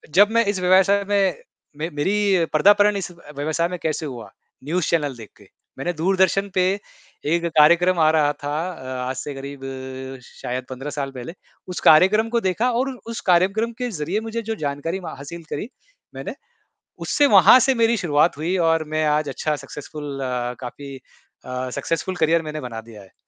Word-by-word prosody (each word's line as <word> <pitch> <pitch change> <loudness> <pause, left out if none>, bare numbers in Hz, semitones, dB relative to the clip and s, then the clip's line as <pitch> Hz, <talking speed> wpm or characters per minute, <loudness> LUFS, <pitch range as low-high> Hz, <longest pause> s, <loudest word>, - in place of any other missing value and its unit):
जब 205 +2 +7
मैं 230 -1 +3
इस 200 -2 -1
व्यवसाय 190 +2 +4
में, 195 -5 +2 0.4
मैं 160 +3 -3
मेरी 190 +2 +2
पदार्पण 205 +5 +5
इस 190 -2 -4
व 170 - -18 0.2
व्यवसाय 155 +3 0
में 180 - -4
कैसे 160 0 -1
हुआ 120 -7 -7 0.4
न्यूज़ 170 +2 -1
चैनल 145 -5 0
देख 110 -3 -11
के, - - -18 0.3
मैंने 175 - -2
दूरदर्शन 190 +3 +1
पे, 185 - +3 0.6
एक 170 +3 +1
कार्यक्रम 170 +3 +4
आ 155 0 +5
रहा 150 -2 +3
था 145 0 -5 0.2
अ, 130 -5 -6
आज 130 - -3
से 145 - -5
करीब 140 0 -8 0.6
शायद 125 +1 -6
15 130 +3 -6
साल 135 -1 -3
पहले, 130 +5 -8 0.3
उस 180 - -4
कार्यक्रम 200 +8 +5
को 235 - +1
देखा 235 +7 0
और 255 +3 0
उ - - -12
उस 230 - -4
कार्यक्रम 195 +6 +2
के 250 - -2
ज़रिए 170 +4 -2
मुझे 230 +1 -3
जो 225 0 -4
जानकारी 150 +3 -3
मा 170 -3 -7
हासिल 165 +5 -9
करी 205 - -4 0.5
मैंने, - - -6 0.6
उससे 290 - +2
वहाँ 200 +4 +8
से 265 +1 +3
मेरी 230 0 +3
शुरुआत 155 -4 +2
हुई 170 +5 -1
और 165 -1 +2
मैं 155 0 +1
आज 150 -1 +1
अच्छा 150 +2 -2
सक्सेसफुल 145 -1 -7
अ, 125 -1 -2
काफ़ी 135 +2 -8 0.5
अ, 125 0 -4
सक्सेसफुल 165 +3 -2
करियर 165 0 +2
मैंने 155 -1 -6
बना 115 -3 -6
दिया 110 -2 -13
है। 95 - -20
165 Hz, 185 wpm, -22 LUFS, 145-195 Hz, 0.6 s, वहाँ